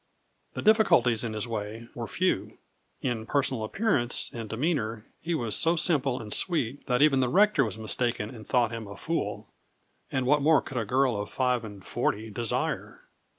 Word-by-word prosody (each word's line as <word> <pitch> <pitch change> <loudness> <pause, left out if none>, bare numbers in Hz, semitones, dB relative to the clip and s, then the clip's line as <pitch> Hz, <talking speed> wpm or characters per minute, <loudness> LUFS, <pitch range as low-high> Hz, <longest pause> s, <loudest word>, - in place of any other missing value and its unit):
The - - -4
difficulties 160 - +4
in 115 -2 -3
his 110 +2 -3
way 110 +1 -5
were 120 -1 -5
few. 185 +1 -1 0.5
In 115 -4 -2
personal 130 -5 0
appearance 120 - 0
and 115 -2 -6
demeanour 115 -5 -1 0.2
he 170 +1 -1
was 115 -8 -1
so 165 +1 +3
simple 145 -7 +2
and 105 -2 -4
sweet 145 - -1
that 125 +2 +3
even 145 -3 +4
the 130 -1 +2
rector 200 0 +4
was 110 -3 -3
mistaken 110 0 -2
and 110 -3 -11
thought 120 -3 +2
him 115 -2 -6
a 100 0 -9
fool, 165 +8 -3 0.6
and 130 -1 0
what 145 +3 +3
more 155 0 +5
could 135 - -7
a 115 - -1
girl 130 +2 +2
of 105 - -6
five 125 -2 0
and 100 -3 -10
forty 110 +1 -2
desire? 115 +2 -2
125 Hz, 180 wpm, -27 LUFS, 110-145 Hz, 0.6 s, more